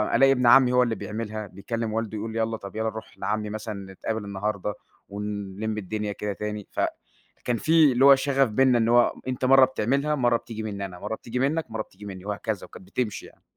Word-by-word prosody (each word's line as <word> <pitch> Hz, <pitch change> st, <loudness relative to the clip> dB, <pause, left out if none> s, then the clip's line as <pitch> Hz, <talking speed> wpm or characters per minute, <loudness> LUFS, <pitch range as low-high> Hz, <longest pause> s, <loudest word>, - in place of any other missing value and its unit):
ألاقي 135 Hz, +3 st, +6 dB
ابن 125 Hz, -2 st, +2 dB
عمي 125 Hz, +1 st, +7 dB
هو 125 Hz, 0 st, +5 dB
اللي 115 Hz, -2 st, -1 dB
بيعملها 110 Hz, -1 st, -5 dB
بيكلم 110 Hz, +4 st, -4 dB
والده 110 Hz, -1 st, -2 dB
يقول 110 Hz, +2 st, -4 dB
له 115 Hz, -, -2 dB
يلّا 110 Hz, 0 st, -1 dB
طيب 100 Hz, -1 st, -10 dB
يلّا 110 Hz, 0 st, 0 dB
نروح 110 Hz, 0 st, -9 dB
لعمي 105 Hz, 0 st, -2 dB
مثلًا 105 Hz, -2 st, -6 dB
نتقابل 110 Hz, +2 st, -4 dB
النهاردة، 100 Hz, 0 st, -2 dB, 0.4 s
ونلم 105 Hz, +1 st, -4 dB
الدنيا 105 Hz, +1 st, -3 dB
كده 105 Hz, 0 st, -3 dB
تاني. 105 Hz, 0 st, -5 dB
فكان 120 Hz, -1 st, -4 dB
في 160 Hz, +1 st, +5 dB
اللي 130 Hz, +2 st, +4 dB
هو 140 Hz, 0 st, +10 dB
شغف 135 Hz, -1 st, +2 dB
بيننا 125 Hz, +3 st, +4 dB
إن 115 Hz, -1 st, +2 dB
هو 120 Hz, 0 st, +5 dB
أنتَ 130 Hz, 0 st, -1 dB
مرّة 135 Hz, 0 st, +7 dB
بتعملها، 140 Hz, +4 st, 0 dB
مرّة 120 Hz, -4 st, +3 dB
بتيجي 110 Hz, -1 st, -7 dB
منِّي 100 Hz, -2 st, -4 dB
أنا، 90 Hz, -2 st, -9 dB
مرّة 110 Hz, -, -3 dB
بتيجي 120 Hz, +2 st, -5 dB
منك، 145 Hz, +2 st, 0 dB
ومرّة 110 Hz, 0 st, -3 dB
بتيجي 105 Hz, -, -15 dB
منِّي 95 Hz, -2 st, -8 dB
وهكذا. 105 Hz, 0 st, -3 dB
وكانت -, -, -13 dB
بتمشي 105 Hz, +1 st, -3 dB
يعني. -, -, -18 dB
110 Hz, 210 wpm, -25 LUFS, 105-125 Hz, 0.4 s, هو